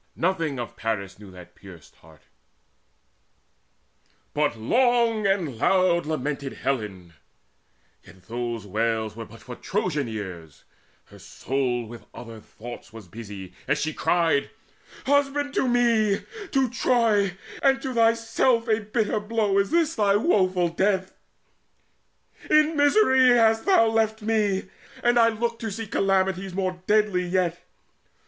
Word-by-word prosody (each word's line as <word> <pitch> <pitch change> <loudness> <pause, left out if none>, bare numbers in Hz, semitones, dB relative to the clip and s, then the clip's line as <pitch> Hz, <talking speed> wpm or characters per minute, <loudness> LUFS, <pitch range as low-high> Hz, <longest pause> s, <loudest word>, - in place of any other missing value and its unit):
Nothing 165 -6 -1
of 120 - -6
Paris 100 -4 -4
knew 105 -2 -12
that 90 -1 -14
pierced 90 -5 -15
heart; 80 -2 -20 2.1
But 145 -5 0
long 230 - +2
and 170 - -1
loud 180 -1 +2
lamented 140 -2 -3
Helen; 105 -10 -4 0.9
yet 95 - -18
Those 120 -2 -4
wails 110 +1 -1
were 115 0 -7
but 115 +2 -15
for 125 - -8
Trojan 160 - -2
ears; 90 -9 -8 0.4
her - - -16
soul 125 -2 -2
With 110 -1 -12
other 115 -2 -9
thoughts 120 +2 -11
was 110 -4 -12
busy, 100 -2 -9
as 150 - +1
she 155 +1 -2
cried: 165 -5 +1 0.6
"Husband, 285 +1 +1
to 265 - +1
me, 230 -4 +2 0.3
to 270 -2 +2
Troy, 220 -7 +1 0.2
and 270 -1 +3
to 265 - -3
thyself 230 +1 +2
A 220 -1 +2
bitter 215 0 -1
blow 210 -2 0
is 200 - +1
this 330 -1 +2
thy 205 -2 +2
woeful 185 - +2
death! 190 +2 0 1.4
In 305 +1 +4
misery 285 -3 +4
hast 225 -2 +4
thou 375 -13 +5
left 220 -1 0
me, 210 -3 0 0.4
and 240 0 +3
I 230 - +6
look 230 +1 -2
To 225 - -4
see 225 +2 -5
calamities 190 -2 0
more 185 -2 -2
deadly 210 -4 +2
yet. 175 -1 -1
190 Hz, 130 wpm, -24 LUFS, -, 2.1 s, I